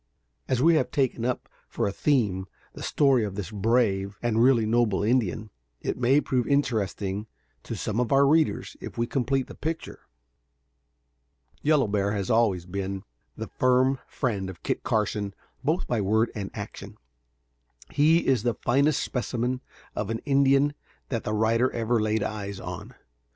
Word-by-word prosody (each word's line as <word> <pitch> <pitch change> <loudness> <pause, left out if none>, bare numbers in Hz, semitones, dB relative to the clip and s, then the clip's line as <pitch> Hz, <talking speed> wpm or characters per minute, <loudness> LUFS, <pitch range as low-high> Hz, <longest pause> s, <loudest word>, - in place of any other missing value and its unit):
As 130 0 +1
we 165 +1 +6
have 155 - +2
taken 130 -4 0
up 125 0 -2 0.2
for - - -2
a - - -1
theme 100 -8 +1 0.3
the - - -10
story 135 -5 +3
of 100 -2 -4
this 100 0 -5
brave 100 -2 +1
and 115 -1 +2
really 120 -3 +5
noble 110 -3 +2
Indian, 110 -2 0 0.3
it - - -2
may 125 +4 +3
prove 125 -4 0
interesting 105 -7 0 0.3
to - - -6
some 110 +2 -2
of 125 - 0
our 140 0 +5
readers 155 +2 +2
if - - -8
we 115 - +1
complete 135 +1 0
the - - -11
picture. 160 +1 -5 1.5
Yellow 150 -3 +3
Bear 100 0 0
has 100 +1 -2
always 105 -6 +2
been 95 +1 -4 0.3
the - - -4
firm 130 +1 +3
friend 100 -7 -2
of 95 - -11
Kit - - -1
Carson 105 -4 -1 0.3
both 155 +6 +1
by 120 -3 0
word 110 +4 +2
and 100 -3 -4
action. 105 -2 -8 0.9
He 155 +3 +4
is 130 -5 +3
the 120 0 0
finest 140 +5 +2
specimen 125 0 -2 0.3
of 105 - -2
an 115 - -1
Indian 140 0 +4 0.4
that 115 -4 -3
the 105 - -1
writer 115 +4 +2
ever 115 0 +1
laid 110 0 +1
eyes 100 -2 -4
on. - - -7
115 Hz, 160 wpm, -26 LUFS, 105-130 Hz, 1.5 s, we